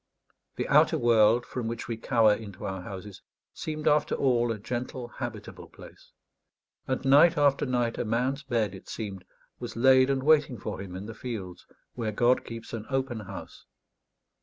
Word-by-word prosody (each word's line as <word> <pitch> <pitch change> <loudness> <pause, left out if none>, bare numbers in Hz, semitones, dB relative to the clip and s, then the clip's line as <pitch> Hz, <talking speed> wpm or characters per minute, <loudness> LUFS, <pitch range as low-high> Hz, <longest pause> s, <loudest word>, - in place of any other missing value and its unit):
The - - -3
outer - - +4
world, 115 0 +4
from 125 -3 -4
which 115 0 -5
we 115 - -2
cower 115 -2 +3
into 105 -3 -7
our 95 -1 -4
houses, 95 +1 -9 0.3
seemed 155 -1 -4
after 150 0 +3
all 120 -3 +2
a 110 - -3
gentle 120 +3 -5
habitable 120 -4 -7
place; - - -15 0.8
and 130 +1 -2
night 150 +5 +6
after 145 -1 +3
night 120 -2 0
a - - +1
man's 125 +5 -1
bed, 115 -7 -1
it 95 - -12
seemed, 100 -4 -6 0.4
was - - -7
laid 130 +2 +5
and 135 -1 0
waiting 145 -4 +3
for 95 - -5
him 95 -2 -8
in 95 +2 -6
the 115 - -7
fields, 105 -8 -7 0.3
where 115 -3 -3
God 120 +4 +2
keeps 115 -1 -8
an 110 -2 -5
open 135 -3 -1
house. 95 -2 -10
120 Hz, 170 wpm, -28 LUFS, 105-130 Hz, 0.8 s, night